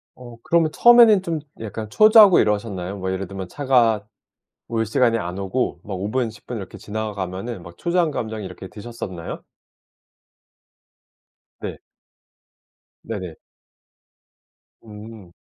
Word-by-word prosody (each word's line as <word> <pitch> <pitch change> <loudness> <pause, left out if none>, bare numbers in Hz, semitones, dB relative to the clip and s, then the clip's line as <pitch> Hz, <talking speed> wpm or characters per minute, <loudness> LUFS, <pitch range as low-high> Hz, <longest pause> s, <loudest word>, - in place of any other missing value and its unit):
어 120 -2 -12
그러면 165 -2 +2
처음에는 235 -3 +7
좀 170 -4 -3 0.2
약간 110 0 -6
초조하고 215 - +7
이러셨나요? 100 -3 -1
뭐 95 -1 -3
예를 95 0 -3
들면 95 -1 -7
차가 115 -3 +2 0.6
올 115 -1 -1
시간에 115 0 +2
안 90 -2 -5
오고 100 0 -2
막 100 - -5
5 100 +3 -3
분, 125 -1 0
10 110 -1 -17
분 125 - -5
이렇게 100 -1 -8
지나가면은 105 -1 -5
막 85 0 -12
초조한 170 -1 +1
감정이 110 -6 -4
이렇게 95 +1 -9
드셨었나요? 105 -6 -7 2.2
네. - - -6 1.3
네네. 95 -7 -6 1.5
음. 105 -3 -12
110 Hz, 250 characters per minute, -22 LUFS, 95-125 Hz, 2.2 s, 처음에는